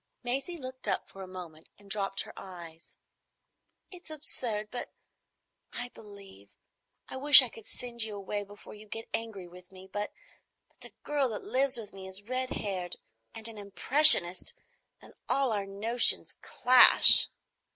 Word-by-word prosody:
Maisie 270 +8 -5
looked 260 -3 -10
up - - -3
for 195 - -15
a 190 - -10
moment 175 -4 -13
and 200 - -22
dropped 195 -1 -4
her - - -12
eyes. 170 -3 -14 0.9
"It's 360 -3 -13
absurd, 240 -8 -5
but—I 245 0 -13
believe. 200 - -17 0.5
I - - -10
wish 280 0 +9
I 250 - -5
could 225 -1 -17
send 240 -1 -9
you 220 -2 -4
away 205 +1 -7
before 205 +1 -16
you 215 0 -16
get 225 +2 -9
angry 220 -5 -7
with 180 +1 -18
me. 190 0 -16
But—but 205 0 -13
the - - -12
girl 285 -3 -3
that 215 - -8
lives 265 0 -1
with 220 -3 -9
me 190 -1 -12
is 190 +1 -8
red 255 +3 -6
haired, 185 -7 -5 0.4
and 225 0 -7
an 225 -2 -12
impressionist, 200 - +4 0.4
and - - -19 0.2
all 275 -3 -1
our 200 -2 -5
notions 225 +5 +1
clash." 250 +1 +6
210 Hz, 150 wpm, -27 LUFS, 195-250 Hz, 0.9 s, wish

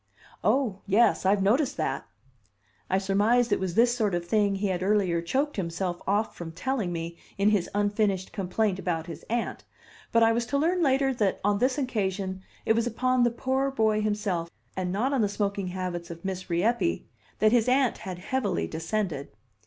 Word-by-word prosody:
"Oh, 245 -8 +1
yes! 205 -1 +3
I've 195 0 +3
noticed 260 +7 +2
that." 135 - -2 0.8
I 190 - +2
surmised 210 +5 +2
it - - +3
was 185 -2 -3
this 240 +1 +4
sort 210 -6 +1
of 175 0 -2
thing 205 0 +2
he 200 +1 -1
had 180 -1 -1
earlier 190 -4 +2
choked 275 - -1
himself 175 0 -2
off 205 +3 +1
from 165 -2 -7
telling 220 0 -2
me 170 0 -5 0.2
in 200 +2 +3
his 200 -5 +1
unfinished 205 -2 0
complaint 195 0 0
about 165 -4 -2
his 165 - -8
aunt; 235 0 -2 0.5
but 230 0 +4
I 225 - +5
was 235 +1 0
to 280 - 0
learn 345 +5 +1
later 270 -2 +3
that 210 -6 0
on 205 0 +2
this 255 +3 +2
occasion 195 -7 -2 0.2
it 220 - +4
was 230 +1 +1
upon 255 +2 +1
the 240 - +5
poor 260 +3 0
boy 220 -5 +1
himself 205 -5 -1 0.3
and 185 -1 -2
not 240 +9 0
on 265 - +2
the 205 - +2
smoking 200 -1 -2
habits 180 -2 -4
of 170 +2 -9
Miss 190 0 -4
Rieppe, 225 - +1 0.3
that 215 - +4
his 240 0 +3
aunt 260 -1 +2
had 185 -4 -6
heavily 180 - -1
descended. 165 - -3
205 Hz, 185 wpm, -27 LUFS, 185-240 Hz, 0.8 s, I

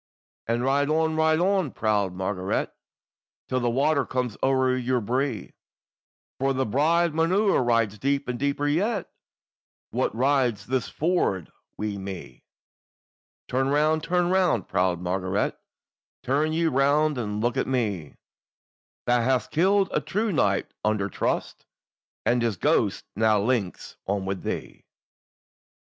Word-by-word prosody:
"And 115 +1 0
ride 140 +2 +2
on, 160 0 +1
ride 160 0 +3
on, 190 -3 +2
proud 105 -3 0
Margaret! 95 0 -2 0.7
Till 130 - 0
the 120 -1 0
water 140 +4 +2
comes 125 -4 -2
o'er 130 -1 +2
your 130 0 0
bree, 125 0 -2 0.9
For 135 +1 +1
the 130 0 0
bride 160 +8 +2
maun 165 +2 +1
ride 120 - +2
deep, 140 +4 0
and 125 -1 -3
deeper 140 +1 0
yet, 195 +7 0 0.8
Wha - - 0
rides 125 -2 +1
this 130 -3 -1
ford 155 - 0 0.3
wi' 105 -1 -3
me. 95 -2 -8 1.0
"Turn 130 +1 0
round, 155 +2 +2
turn 180 +1 +1
round, 180 - +2
proud 90 -1 +1
Margaret! 95 +2 -1 0.7
Turn 145 +4 +1
ye 165 +1 +1
round, 145 0 +2
and 105 -2 -3
look 120 +2 0
on - - -1
me, 105 - -2 0.9
Thou 120 0 +3
hast 125 -2 0
killed 195 +4 +3
a - - 0
true 215 +2 -1
knight 100 - +1
under 105 -2 0
trust, - - -3 0.6
And 120 0 +2
his 115 -4 0
ghost - - +1
now 110 0 +3
links 105 -3 -2
on 100 0 -1
with 95 0 -3
thee." - - -6
130 Hz, 135 wpm, -25 LUFS, 105-155 Hz, 1.0 s, ride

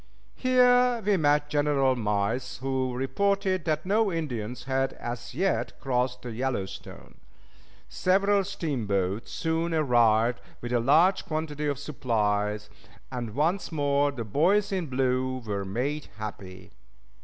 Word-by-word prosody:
Here 250 -1 +4
we 205 -1 +3
met 145 -3 +2
General 145 -3 +2
Miles, 110 +2 -1
who 130 0 -1
reported 190 - 0
that 155 0 -1
no 210 +2 +2
Indians 125 -8 -4
had 135 +1 0
as 120 +1 -7
yet 190 +5 -1
crossed 125 -1 -1
the 120 - -5
Yellowstone. 120 -5 -5 0.7
Several 200 +2 +2
steamboats 115 - -2
soon 165 +1 -1
arrived 120 -5 +3 0.2
with 120 +1 -5
a 120 - +3
large 165 +10 +4
quantity 155 -2 -3
of 145 -2 -1
supplies, 105 -7 -1 0.4
and 120 -4 -5
once 170 +8 0
more 145 -2 +1
the 120 -5 -5
"Boys 190 - +2
in 185 -4 -1
Blue" 130 0 0
were 100 -2 -3
made 135 +10 -2
happy. 100 -3 -8
135 Hz, 125 wpm, -27 LUFS, 120-165 Hz, 0.7 s, Here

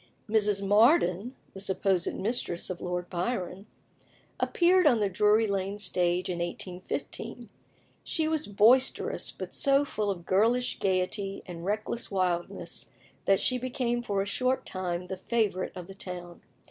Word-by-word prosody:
Mrs. 210 -2 +1
Mardyn 215 - +4 0.2
(the 195 - -8
supposed 190 -2 0
mistress 190 -4 -1
of 180 - -6
Lord 180 0 -3
Byron) 185 +1 -3 0.7
appeared 360 -1 +4
on 245 -6 +5
the 205 -2 +1
Drury 210 +4 +4
Lane 200 -1 -2
stage 180 -2 0
in 175 -2 -3
1815. 180 +1 -5 0.5
She 315 -1 0
was 315 -1 0
boisterous, 225 +6 +3
but - - -7
so 275 -1 +3
full 215 -6 -2
of 175 -3 -4
girlish 230 +6 +2
gaiety 195 +1 -1
and 175 -2 -8
reckless 215 +3 -2
wildness 180 -3 -2 0.4
that 195 -1 +4
she 255 -1 +1
became 245 -1 -1
for 200 -4 -1
a - - -6
short 255 +5 0
time 180 -1 -3
the 190 +1 -5
favourite 200 -3 -1
of 180 - -6
the 195 - -10
town. 180 -2 -7
195 Hz, 145 wpm, -29 LUFS, 180-235 Hz, 0.7 s, on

